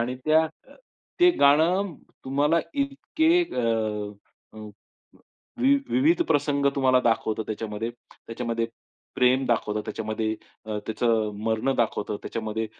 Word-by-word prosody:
आणि 125 +2 -2
त्या 155 +1 +4
अ, 160 - -12 0.5
ते 355 0 +7
गाणं 165 +6 +4 0.3
तुम्हाला 145 +5 +2
इतके 315 +5 +1
अ, 125 - -3 1.0
अ, - - -9 1.0
वि 275 +2 +5 0.2
विविध 325 +7 +3
प्रसंग 140 -1 +1
तुम्हाला 130 -2 +4
दाखवतात 110 -2 0
त्याच्यामध्ये. 110 +1 -4 0.4
त्याच्यामध्ये 115 0 -2 0.5
प्रेम 130 +1 +3
दाखवतं, 105 -3 0
त्याच्यामध्ये 110 0 -2 0.3
अ, 105 -1 -3
त्याचं 110 -1 0
मरणं 115 +4 0
दाखवतं, 105 -2 -1
त्याच्यामध्ये 110 0 -3
125 Hz, 115 wpm, -25 LUFS, 110-160 Hz, 1.0 s, ते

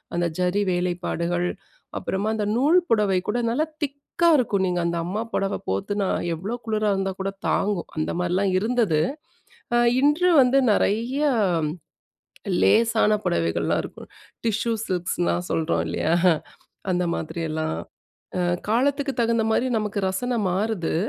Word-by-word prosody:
அந்த 175 - +1
ஜரி 180 +3 +1
வேலைப்பாடுகள், 175 0 -1 0.5
அப்புறமா 200 +3 -2
அந்த 210 -1 -1
நூல் 300 +7 +4
புடவை 210 -4 +3
கூட 235 +3 0
நல்லா 295 +7 +1 0.2
திக்கா 285 +4 -1
இருக்கும். 205 -6 +1
நீங்க 180 -1 0
அந்த 170 0 -1
அம்மா 205 +5 -2
புடவை 195 0 0
போத்துனா, 195 - -1 0.3
எவ்வளோ 195 +9 -4
குளுரா 215 -1 0
இருந்தா 195 0 -1
கூட 195 +1 -2 0.2
தாங்கும். 200 -4 0
அந்த 155 - -1
மாரிலாம் 185 +2 +1
இருந்தது. 220 -8 +1 0.8
அ - - +5 0.2
இன்று 300 +6 +3
வந்து, 255 +2 +3
நெறைய 235 +8 0 1.4
லேசான 220 - +4
புடவைகள்லாம் 85 -1 0
இருக்கும், - - -10 0.4
டிஷ்யூ 225 +1 0 0.2
சில்க்ஸ்ன்னுலாம் 175 -1 -1
சொல்றோம் 165 +1 0
இல்லையா? 160 - 0 0.8
அந்த 180 0 +1
மாதிரியெல்லாம். 160 - -3 0.6
அ - - +1 0.3
காலத்துக்கு 275 +4 +1
தகுந்த 230 0 +2
மாரி 245 +3 +2
நமக்கு 210 -1 -3
ரசனை 240 +6 -1
மாறுது. 195 -3 -1
200 Hz, 125 wpm, -24 LUFS, 175-230 Hz, 1.4 s, அ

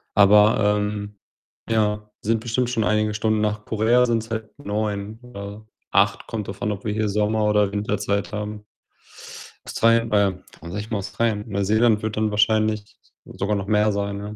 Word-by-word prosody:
Aber, 105 +1 +5
ähm, 105 -1 -4 0.5
ja, 105 -1 0
sind 115 +1 +1
bestimmt 120 +2 -1
schon 115 -3 0
einige 105 0 +1
Stunden. 110 0 0
Nach 105 0 -1
Korea 115 +3 +3
sind's 115 -1 -1
halt 110 -1 -4
9 105 -2 -3
oder 105 -2 -9 0.2
8. - - +2
Kommt 105 -3 -4
drauf 95 0 -8
an, 105 - 0
ob 100 +1 -6
wir 105 - -1
hier 110 0 0
Sommer 105 +1 +1
oder 105 -1 +2
Winterzeit 105 -1 -1
haben. 105 0 -5 1.0
Australien 115 0 +2
äh, 100 -3 +2 0.2
warum 85 +2 -10
sage 100 - -3
ich 105 - -6
immer 110 -4 -1
Australien? 105 +1 -1
Neuseeland 105 +3 +2
wird 110 -1 -3
dann 110 -1 +1
wahrscheinlich 105 0 +1 0.3
sogar 105 +2 -2
noch 100 0 -4
mehr 105 0 +3
sein, 100 0 -2
ja. 105 +1 -7
105 Hz, 170 wpm, -23 LUFS, 105-110 Hz, 1.0 s, Aber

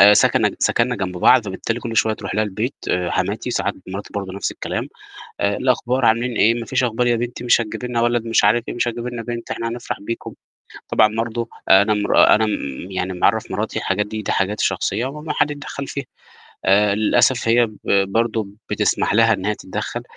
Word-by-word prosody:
آآ 105 +1 +9
سكنّ - - +3
سكنّا 120 +1 +1
جنب 90 -2 -4
بعض 125 +5 +5
فبالتالي 115 +5 -3
كلّ 115 -2 -5
شوية 110 0 +3
تروح - - -6
لها 110 - +2
البيت 110 +6 -3 0.3
حماتي - - -2
ساعات - - -1
مراتي 100 +2 -6
برضه 100 -2 -4
نفْس 100 0 -3
الكلام، - - -4 0.5
"إيه 100 0 +1
الأخبار 125 0 0
عاملين 115 +2 +2
إيه، 115 +2 +4
ما 120 -1 -5
فيش 130 -1 +1
أخبار 120 +1 0
يا 120 -1 +3
بنتي 120 +1 -4
مش 120 -1 +4
هتجيبي 115 +2 -4
لنا 120 -1 0
ولد 120 -1 +1
مش 115 - +3
عارف 110 +3 +3
إيه - - -4
مش 120 0 0
هتجيبي 120 +1 -4
لنا 120 -1 -5
بنت؟ 120 0 -6
إحنا 115 - -3
هنفرح 120 +1 -5
بيكم." 115 +3 -6 0.6
طبعًا 110 0 +3
برضه 115 +1 -2 0.2
أنا 100 +3 +6
مرا 105 -1 +5
أنا 110 +1 +2
م 105 - -1 0.4
يعني 95 0 -2
معرّف 90 - +1
مراتي - - -2
الحاجات 105 +2 -1
دي، 110 +1 -5
دي 105 - -3
حاجات 100 +2 0
شخصية 120 - 0
وممنوع 150 +3 -5
حَد 150 - +1
يتدخّل 140 -1 -6
فيها، 140 -2 -5 0.6
آآ 100 +1 +4
للأسف 115 +3 +2
هي 120 +1 +4
ب 110 -1 -14 0.3
برضه 115 -2 0 0.2
بتسمح - - +1
لها 115 0 +5
إن 95 0 -5
هي 105 - +1
تتدخّل - - -5
115 Hz, 200 wpm, -20 LUFS, 105-120 Hz, 0.6 s, آآ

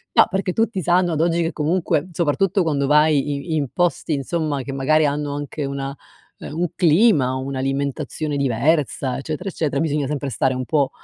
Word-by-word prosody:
No, - - +7
perché 190 -1 -1
tutti 225 -4 0
sanno 175 +1 +2
ad 155 - 0
oggi 170 0 +2
che 165 - -1
comunque, 160 0 0
soprattutto 175 +4 +1
quando 140 -4 0
vai 150 -1 +3 0.2
i 160 - +1
in 145 -3 0
posti 175 -2 0
insomma 145 0 -2
che 135 - -6
magari 150 +3 +2
hanno 145 0 -1
anche 145 +1 -5
una, 135 0 -4 0.4
ehm, 150 - -7
un 175 - +1
clima, 160 - +4
un'alimentazione 140 +3 -3
diversa, 140 0 0
eccetera, 155 +6 -5
eccetera, 150 -5 -1
bisogna 150 -2 0
sempre 140 -1 -3
stare 130 0 0
un 130 0 -3
po' 145 -4 +1
150 Hz, 175 wpm, -21 LUFS, 140-165 Hz, 0.4 s, No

